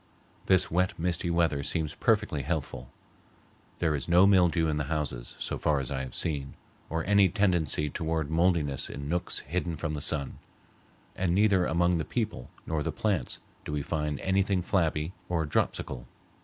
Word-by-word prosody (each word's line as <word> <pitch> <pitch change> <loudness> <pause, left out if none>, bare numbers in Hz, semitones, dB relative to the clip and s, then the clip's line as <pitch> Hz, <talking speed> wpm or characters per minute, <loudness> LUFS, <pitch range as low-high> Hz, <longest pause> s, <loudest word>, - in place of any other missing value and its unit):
This 95 -2 +4
wet, 90 +4 +1
misty 85 +1 -1
weather 85 -4 +2
seems 75 +1 -2
perfectly 105 -9 +1
healthful. 70 -4 -4 0.9
There 80 -3 +1
is 70 +2 -3
no 90 +3 +7
mildew 90 -4 +4
in 75 -1 0
the 75 - -1
houses, 70 -5 -3
as - - -4
far 75 -2 +2
as 65 -1 -4
I 65 - -1
have 65 -1 -6
seen, 70 -5 -2 0.3
or 80 +1 -2
any 100 -2 +5
tendency 85 -8 +2
toward 80 -1 -2
mouldiness 80 -5 +1
in 70 0 -6
nooks 85 +3 -1
hidden 85 +3 -2
from 75 0 -3
the 75 - -4
sun; 70 -3 -1 0.8
and 90 -2 0
neither 100 -3 +4
among 85 +1 +2
the - - 0
people 110 - -3 0.2
nor 80 -2 -1
the - - -1
plants 95 - -1 0.2
do - - -6
we 75 -1 -1
find 75 -1 -2
anything 95 -1 +1
flabby 80 -3 0 0.2
or 85 -3 0
dropsical. 60 -4 -1
80 Hz, 170 wpm, -29 LUFS, 75-90 Hz, 0.9 s, no